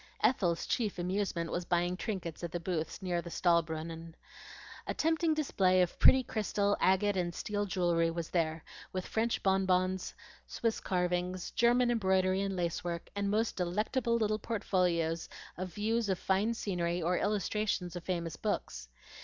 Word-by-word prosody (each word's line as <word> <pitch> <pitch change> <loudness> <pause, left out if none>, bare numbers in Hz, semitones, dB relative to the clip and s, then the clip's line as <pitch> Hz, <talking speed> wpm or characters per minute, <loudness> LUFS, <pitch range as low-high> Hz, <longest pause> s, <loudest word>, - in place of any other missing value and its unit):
Ethel's 175 -9 +2
chief 215 -6 -1
amusement 180 -2 -1
was 175 - -1
buying 175 +1 +1
trinkets 180 -5 -4
at 170 - -3
the 175 - -2
booths 165 0 -3
near 175 -2 0
the 170 - -8
Stahlbrunnen. 165 -1 0 0.7
A - - -2
tempting 320 0 +2
display 190 -11 +2
of 175 - -4
pretty 260 0 +7
crystal, 205 -3 0
agate, 195 +2 +3
and 175 -2 -1
steel 205 -1 -2
jewelry 175 -3 +2
was 165 -1 -4
there, 160 -2 0 0.3
with 185 -1 -3
French 225 +1 -1
bonbons, 190 -1 +1 0.3
Swiss 230 -1 -1
carvings, 180 0 -1
German 240 +1 +3
embroidery 190 -3 +2
and 195 -1 -2
lace 170 -2 -2
work, 170 -1 -4
and 200 0 0
most 220 +2 +1
delectable 215 +7 0
little 215 -1 0
portfolios 175 -7 0 0.3
of 185 0 -5
views 220 +2 0
of 190 - +1
fine 200 +6 +1
scenery 175 -5 -1
or 175 +1 +1
illustrations 205 -3 -1
of 175 - -6
famous 170 -3 -3
books. - - -3
185 Hz, 155 wpm, -32 LUFS, 175-210 Hz, 0.7 s, pretty